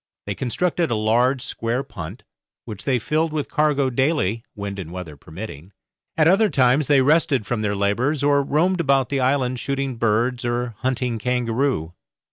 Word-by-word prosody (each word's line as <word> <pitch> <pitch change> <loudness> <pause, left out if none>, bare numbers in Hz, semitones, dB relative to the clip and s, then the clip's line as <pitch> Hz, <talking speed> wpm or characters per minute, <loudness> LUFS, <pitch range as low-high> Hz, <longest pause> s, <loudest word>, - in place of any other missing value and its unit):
They 100 - -2
constructed 165 - -1
a 120 - 0
large 120 +4 +2
square 120 +3 -2
punt, 85 - -9 0.4
which 105 -3 -8
they 130 -3 +2
filled 155 +7 0
with 150 -2 -3
cargo 150 -4 +2
daily, 125 - 0
wind 100 -1 -5
and 85 -3 -7
weather 90 -4 -7
permitting; 80 +3 -9 0.4
at 155 -1 +4
other 200 +5 +4
times 130 0 +3
they 140 -2 +4
rested 145 -5 +2
from 120 -1 -2
their 105 -1 -1
labours, 120 +9 0
or 145 0 +4
roamed 170 +7 +1
about 135 -4 +2
the 140 - 0
island 130 -1 +1
shooting 135 -2 -2
birds 120 +3 +1
or 120 0 -2
hunting 125 -3 -1
kangaroo. 125 - -1
125 Hz, 165 wpm, -22 LUFS, 110-140 Hz, 0.4 s, at